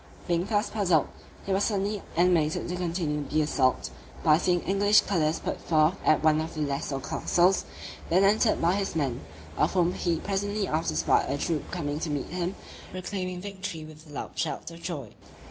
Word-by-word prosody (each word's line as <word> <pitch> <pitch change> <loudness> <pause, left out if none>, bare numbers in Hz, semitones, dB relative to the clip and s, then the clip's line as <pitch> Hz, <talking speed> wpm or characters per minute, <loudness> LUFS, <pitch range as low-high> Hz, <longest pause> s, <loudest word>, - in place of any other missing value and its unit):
Being 175 0 +1
thus 210 -1 0
puzzled, 180 -8 +2 0.4
he 195 - -3
was 195 +2 +2
suddenly 205 -1 -1 0.2
animated 170 -3 +2
to 180 - -2
continue 165 -4 -1
the 155 +2 +1
assault, 130 -4 +1 0.3
by 155 0 +5
seeing 175 -1 +2
English 205 +2 +4
colours 160 -5 +1
put - - -4
forth 155 0 +3
at 155 0 +3
one 155 0 +4
of 160 +1 -6
the 155 - -3
lesser 140 -1 -2
castles, 180 +7 +2 0.4
then 185 +3 +4
entered 215 +3 +3
by 170 +2 +3
his 195 -3 -2
men; 135 -6 -1 0.4
of - - +2
whom 180 -1 +2
he 170 -2 0
presently 205 +1 -1
after 155 - -1
spied 80 +1 +2
a 140 - 0
troop 155 0 -2
coming 150 -4 -3
to 160 - -3
meet 145 -2 -3
him, 180 +2 -2 0.3
proclaiming 185 -1 -4
victory 190 -5 -6
with 155 0 -13
loud 145 - -6
shouts 165 - -3
of 165 0 -11
joy. 145 -11 -5
170 Hz, 180 wpm, -27 LUFS, 155-190 Hz, 0.4 s, by